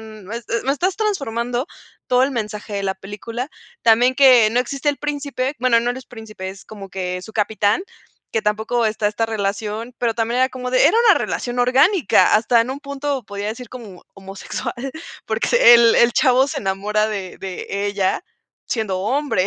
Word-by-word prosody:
no 215 -2 -11
es, 235 -1 -6
eh, 230 - 0
me 270 - +2
estás 365 +6 -1
transformando 250 - -2 0.4
todo 250 0 +3
el 270 +1 +1
mensaje 210 -2 -5
de 200 - -2
la 190 0 -1
película. 225 +7 -7 0.3
También 240 +3 +4
que 255 -5 +6
no 245 +2 +2
existe 275 +3 -1
el 285 - -7
príncipe, 285 -2 -3
bueno 240 -2 +4
no, 240 - -1
no 255 - -7
es 260 - -12
príncipe, 215 -5 -8
es 190 0 -13
como 200 -3 -10
que, 180 -1 -3
es 180 - -10
su 220 - -11
capitán, 210 - +1 0.5
que 225 - 0
tampoco 220 +3 0
está 215 -1 -1
esta 220 +2 -1
relación, 215 +2 -3
pero 235 -2 +1
también 230 +2 -1
era 260 - +4
como 250 -1 -5
de, 255 +1 +4
era 420 - +3
una - - +7
relación 245 0 -3
orgánica, 270 - +4
hasta 230 +2 +4
en 240 +3 -1
un 275 +2 -6
punto 280 -1 -3
podría 205 0 -6
decir 235 +3 -7
como 220 -8 -11
homosexual, 195 +4 -6 0.5
porque - - -1 0.3
el 235 -1 +6
el 235 0 +4
chavo 260 +2 +4
se - - -3
enamora 210 +2 0
de 195 -4 -5
de 195 +1 -4
ella 200 -2 0 0.4
siendo 210 -5 -2
hombre 250 -3 0
230 Hz, 190 wpm, -20 LUFS, 205-255 Hz, 0.5 s, una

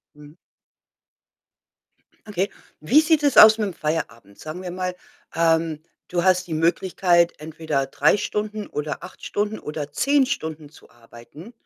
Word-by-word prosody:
Mhm. 150 0 -15 1.9
Okay. 200 -1 -2 0.3
Wie 245 - +4
sieht 315 -1 +2
es 285 -2 +1
aus 220 +1 +9
mit 210 -2 -1
'm 185 - -8
Feierabend? 115 - -4
Sagen 155 +4 -8
wir 180 - -6
mal, 180 0 -4 0.4
ähm, 165 -1 +1 0.3
du 175 -1 -1
hast 185 0 +3
die 165 - -4
Möglichkeit, 170 +1 +2
entweder 155 -2 -3
3 145 +6 +2
Stunden 210 0 -4
oder 150 +1 -5
8 180 - -12
Stunden 210 +1 -2
oder 150 -1 -6
10 280 - +2
Stunden 160 - -5
zu 155 - -19
arbeiten. 120 - -15
170 Hz, 145 wpm, -22 LUFS, 150-205 Hz, 1.9 s, aus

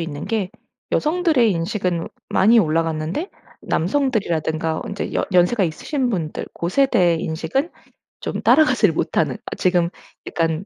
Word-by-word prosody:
있는 155 -3 -5
게 210 -5 -1 0.4
여성들의 310 -7 +2
인식은 180 -1 -2 0.2
많이 225 +5 +4
올라갔는데 165 - 0 0.3
남성들이라든가 170 - 0
인제 200 - -4
여 - - +1
연세가 185 +4 +3
있으신 250 - -2
분들 165 -7 -3
고 170 - -3
세대의 180 -10 +3
인식은 170 - -2 0.5
좀 - - -4
따라가지를 310 -1 +4
못하는 - - 0
아 - - -5
지금 175 -2 +2 0.4
약간 165 +2 -1
180 Hz, 315 characters per minute, -21 LUFS, 165-240 Hz, 0.5 s, 많이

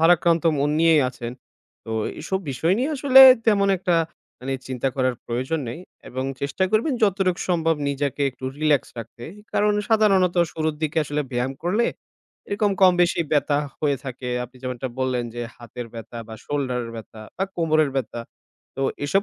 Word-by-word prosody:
ভারাক্রান্ত 170 0 +4 0.2
মন 145 +1 +1
নিয়েই 165 -2 +5
আছেন। 120 -1 -7 0.5
তো 110 - -8 0.2
এ - - -4
এইসব 190 +4 -2
বিষয় 160 +7 +1
নিয়ে 270 +5 0
আসলে 265 -1 +7 0.3
তেমন 200 -2 +4
একটা 180 -1 0 0.5
মানে 135 +1 -3
চিন্তা 130 0 -1
করার 130 -1 +1
প্রয়োজন 130 +7 -2
নেই 140 +9 -6 0.3
এবং 130 +1 -4 0.2
চেষ্টা 145 +7 0
করবেন 225 +7 +2
যতটুকু 190 -3 +2
সম্ভব 165 -2 +2
নিজেকে 140 0 -2
একটু 130 +1 -12
রিল্যাক্স 150 -3 +2
রাখতে। 115 +1 -9 0.3
কারণ 210 0 +3 0.2
সাধারণত 195 -5 +4 0.2
শুরুর 155 -1 -1
দিকে 155 +1 0
আসলে 145 +1 -2
ব্যায়াম 125 +2 -1
করলে 210 +7 +1 0.6
এরকম, 205 0 +1
কম 185 -1 +7
বেশি 175 - +1
ব্যথা 145 -1 +2 0.2
হয়ে 145 -2 +1
থাকে। 125 -1 -6 0.2
আপনি 125 +1 -15
যেমনটা 130 0 -4
বললেন, 130 -2 0
যে 120 - -4
হাতের 120 0 -8
ব্যথা 115 +1 -9
বা 110 - -7
শোল্ডারের 125 -5 -2
ব্যথা 110 0 -10 0.2
বা 190 - 0
কোমরের 155 -3 +2
ব্যথা। 120 -2 -3 0.6
তো 135 - -2 0.2
এসব 195 +7 +2
145 Hz, 165 wpm, -23 LUFS, 130-180 Hz, 0.6 s, আসলে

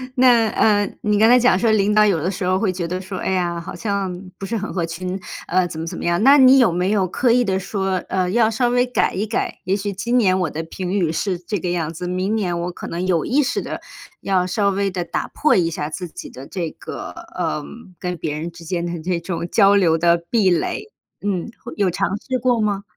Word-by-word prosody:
那， 245 -3 +5
呃， 205 -2 +2
你 210 -1 +1
刚 220 +2 +5
才 250 +1 +7
讲 245 -6 +4
说 225 +3 +2
领 210 -1 +3
导 215 0 +6
有 195 -6 +2
的 175 - 0
时 195 0 -4
候 185 +1 +2
会 200 -2 +1
觉 175 -2 -3
得 180 +2 -3
说： 190 0 -6
“哎 - - -2
呀， 175 -2 0
好 170 - -7
像 200 -3 -2 0.2
不 195 - -6
是 225 +4 -2
很 210 0 -4
合 175 -3 -1
群， 180 +3 -4 0.3
呃， 185 +1 +2
怎 160 - -7
么 165 - -3
怎 - - -5
么 - - -6
样。” 170 +2 +1
那 275 +3 +8
你 265 0 +7
有 235 -8 +5
没 180 +3 0
有 200 -3 +2
刻 240 +7 +1
意 245 +1 +4
地 190 -2 0
说 195 0 -2
呃， 185 -1 0
要 225 +1 +3
稍 240 +3 +1
微 245 +1 +3
改 250 - 0
一 200 +3 -1
改？ 220 - -3
也 190 +2 +1
许 205 0 -3
今 235 +6 0
年 190 -6 +3
我 180 -4 0
的 160 - -4
评 180 +2 -5
语 180 -5 +1
是 185 +2 -1
这 190 +4 -3
个 175 - -3
样 165 -2 -2
子， 175 +2 -6
明 185 +4 -1
年 180 -5 -1
我 175 - -3
可 - - -8
能 175 +2 -3
有 170 -4 +2
意 275 +5 +2
识 275 - -1
地 - - -6 0.4
要 185 -2 +1
稍 200 +2 +1
微 200 0 0
地 180 -1 -2
打 - - -3
破 305 - +2
一 170 -3 +2
下 150 -2 -3
自 180 +3 -5
己 - - -9
的 130 - -10
这 170 +1 -4
个 - - -8 0.2
呃， 75 - -2 0.3
跟 180 -1 -4
别 150 -2 -3
人 165 +2 -5
之 170 0 -13
间 170 0 -2
的 170 -1 -4
这 175 +1 -1
种 170 0 -4
交 200 -2 +5
流 170 -5 +4
的 170 +1 +4
壁 215 -6 +3
垒。 420 - -1 0.3
嗯， 200 +1 -2
会 240 - -7
有 200 -3 +2
尝 175 - 0
试 255 +3 -2
过 245 -1 +2
吗？ 200 -2 0
190 Hz, 270 characters per minute, -21 LUFS, 175-215 Hz, 0.4 s, 那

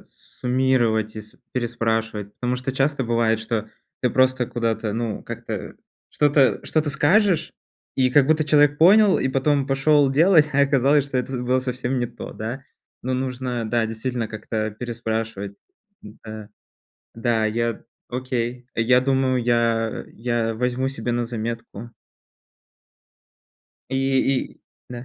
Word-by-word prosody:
суммировать 120 -4 0
и 110 - -4
с 105 0 -13 0.2
переспрашивать, 115 -4 -2
потому 125 0 -2
что 130 +1 -3
часто 135 0 0
бывает, 115 -1 +1
что 110 -1 -3 0.3
ты 125 - +2
просто 130 -1 +2
куда-то, 115 -2 -2
ну, 115 -2 -3
как-то - - -6 0.4
что-то 145 -3 +3
что-то 155 -2 0
скажешь, 175 +6 +2 0.4
и 130 -1 +3
как 135 0 +5
будто 155 0 +2
человек 145 -1 +4
понял, 200 +4 +6
и 130 - 0
потом 135 +1 +1
пошёл 140 0 +3
делать. 155 +1 +5
А 140 - +3
оказалось, 140 +1 +3
что 135 - -3
это 125 +1 -2
з 125 - -2
было 130 +1 +1
совсем 125 0 -2
не 120 - 0
то, 120 0 -9
да. 120 +5 -5 0.4
Но 130 +1 -1
нужно, 125 -2 -3
да, 115 -1 +1
действительно 115 +1 -3
как-то 110 0 -3
переспрашивать. 110 -3 -4 0.5
Да, 110 0 -10 0.7
да, 115 -1 0
я 115 +1 -1 0.3
окей, 125 -1 -3
я 125 +3 +4
думаю, 130 -2 +1
я 115 -2 +1
я 115 -1 -1
возьму 125 +3 -1
себе 130 -3 -3
на 120 0 -1
заметку. 115 -1 -6 2.0
И 135 - -1 0.5
и, - - -21 0.3
да. 120 0 -7
125 Hz, 135 wpm, -23 LUFS, 115-135 Hz, 2.0 s, понял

